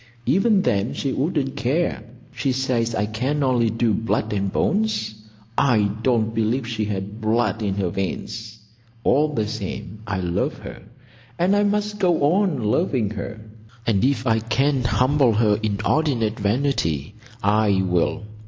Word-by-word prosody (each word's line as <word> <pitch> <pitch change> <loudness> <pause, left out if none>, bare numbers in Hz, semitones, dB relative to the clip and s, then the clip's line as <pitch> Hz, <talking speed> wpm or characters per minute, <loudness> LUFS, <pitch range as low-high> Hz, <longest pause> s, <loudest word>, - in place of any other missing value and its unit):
Even 195 - +3
then 100 +4 0
she 135 - -2
wouldn't 140 -2 -1
care. 140 +1 0 0.3
She 135 - -1
says 120 -3 0
I 105 - +1
can 130 +7 -1
only 125 -3 +2
do 115 0 +1
blood 110 0 -1
and 100 -1 -1
bones. 215 - 0 0.4
I 110 -7 +3
don't 115 -2 +1
believe 115 +3 0
she 110 -2 -2
has 100 -2 -2
blood 110 +1 -1
in 100 -2 -1
her 95 -3 0
veins. 110 +4 -4 0.5
All 145 +4 +3
the 110 -7 -1
same 105 -1 -6
I 100 -2 -1
love 90 -1 -1
her; - - -9 0.6
and 185 +4 +3
I 205 - +3
must 205 0 0
go 170 -5 +3
on 175 - 0
loving 110 - +1
her; 110 +1 -6 0.4
and 105 -4 +2
if 130 -2 +1
I 115 -2 +3
can 130 +4 +1
humble 130 0 +3
her 105 -1 +2
inordinate 110 +2 0
vanity 100 - 0 0.3
I 105 -1 +3
will. 90 +5 0
115 Hz, 150 wpm, -22 LUFS, 105-140 Hz, 0.6 s, Even